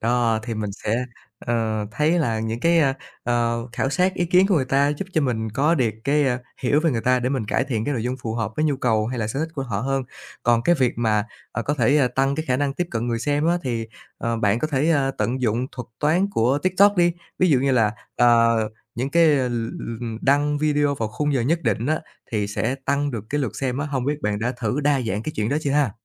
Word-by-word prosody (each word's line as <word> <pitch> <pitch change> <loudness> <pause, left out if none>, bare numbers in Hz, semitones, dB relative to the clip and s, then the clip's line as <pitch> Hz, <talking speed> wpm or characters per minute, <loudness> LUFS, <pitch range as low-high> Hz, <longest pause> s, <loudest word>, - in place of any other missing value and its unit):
Đó, 115 -1 +2
thì 115 -1 -4
mình 105 -1 -3
sẽ, 115 +4 -2 0.3
ờ, 110 -3 -1
thấy 155 +8 +1
là 115 -8 0
những 115 +1 -3
cái, 170 0 +3
a, 135 -3 +2 0.3
ờ, 120 0 0
khảo 135 - -1
sát 185 +3 +1
ý 175 - 0
kiến 185 +2 +4
của 195 - +2
người 135 - +2
ta 135 +2 +2
giúp 150 +6 -3
cho 160 - +2
mình 115 -6 -1
có 145 +9 +2
được 125 -7 +1
cái, 145 +1 +3
a, 125 -1 +1 0.2
hiểu 145 +4 +3
về 165 -1 +2
người 115 - -1
ta 125 +2 +2
để 125 - 0
mình 130 -4 -1
cải 135 - +1
thiện 115 -5 -2
cái 145 - -1
nội 115 - -2
dung 125 +2 -2
phù 110 -1 -3
hợp 110 -2 -2
với 155 - +1
nhu 145 -3 +1
cầu, 110 -4 +1
hay 125 0 -4
là 110 - -1
sở 110 +5 -3
thích 160 0 -3
của 135 - -3
họ 105 -6 -3
hơn. 135 +1 -1 0.4
Còn 120 -1 +3
cái 175 - +4
việc 130 -5 +2
mà, 110 -2 +2 0.3
à, 115 - -2
có 145 - -1
thể 135 +1 +3
tăng 135 +1 +2
cái 155 - -3
khả 125 - +2
năng 140 0 0
tiếp 175 - -1
cận 115 +1 -2
người 115 -1 0
xem 145 +5 0
á 175 +1 +2
thì, 115 -3 -2 0.3
ờ, 115 -1 -1
bạn 105 -1 +2
có 155 - 0
thể, 150 +2 +1
a, 140 -3 +2
tận 130 +2 -1
dụng 120 +2 0
thuật 125 -2 -7
toán 165 +6 +3
của 125 - +2
TikTok 195 +2 +4
đi, 175 -1 +4 0.3
ví 185 - +4
dụ 140 - +5
như 135 +1 +1
là, 110 -4 +3 0.2
ờ, 115 -1 +4 0.3
những 130 +4 -2
cái 170 +1 +5
l 135 -5 +2
l 115 0 -4 0.2
đăng 145 +2 +2
video 145 -1 +2
vào 115 -5 -2
khung 145 +7 -1
giờ 125 - +2
nhất 160 +7 0
định 115 +3 0
á 155 +1 +1 0.3
thì 105 -2 0
sẽ 110 +5 -1
tăng 140 +1 0
được 110 -4 -5
cái 145 +1 0
lượt 115 -6 -3
xem 130 -1 -2
á, 145 - -2
hông 135 -4 -2
biết 145 +1 -2
bạn 105 -1 0
đã 120 +4 -1
thử 120 +6 0
đa 145 -1 +2
dạng 110 -3 -2
cái 155 - -4
chuyện 105 +1 0
đó 140 - +1
chưa 140 - -1
ha? 145 -6 +2
130 Hz, 265 wpm, -23 LUFS, 115-145 Hz, 0.4 s, dụ